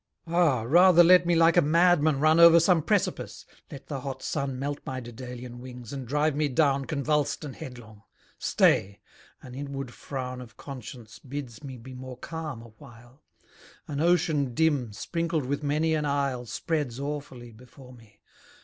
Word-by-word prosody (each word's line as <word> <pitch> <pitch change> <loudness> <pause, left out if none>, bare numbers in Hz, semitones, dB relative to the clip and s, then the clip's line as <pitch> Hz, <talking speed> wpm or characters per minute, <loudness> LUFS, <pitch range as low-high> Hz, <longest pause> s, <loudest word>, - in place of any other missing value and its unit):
Ah! 165 -8 +2
rather 175 +7 +6
let 180 0 +6
me 175 - +3
like 165 0 +5
a 175 - +6
madman 155 -2 +3
run 155 +2 +4
Over 170 0 +9
some 170 0 +3
precipice; - - -2 0.2
let 140 - -10
the 140 -3 -5
hot 135 0 -6
sun 140 -3 -3
Melt 145 +2 -3
my 130 -3 -5
Dedalian 120 0 -9
wings, 125 -1 -10
and 135 -3 -6
drive 150 +3 +1
me 150 0 +1
down 140 0 +1
Convuls'd 150 +1 -1
and 135 - -8
headlong! 115 -5 -11 0.4
Stay! 100 +1 +2 0.4
an 125 - -10
inward 135 -2 -6
frown 130 -2 -6
Of 120 -3 -13
conscience 125 -4 -10
bids 130 -5 -8
me 135 -2 -8
be 130 +3 -11
more 130 0 -9
calm 155 -8 -6
awhile. 120 +3 -16 0.7
An 145 0 -3
ocean 155 -7 +1
dim, 145 -7 +1
sprinkled 165 +6 -2
with 140 +3 -2
many 155 +2 0
an 155 -1 0
isle, 140 -4 -1
Spreads 135 +1 -3
awfully 140 -4 -6
before 125 +3 -15
me. 115 -3 -19
140 Hz, 160 wpm, -27 LUFS, 125-155 Hz, 0.7 s, Over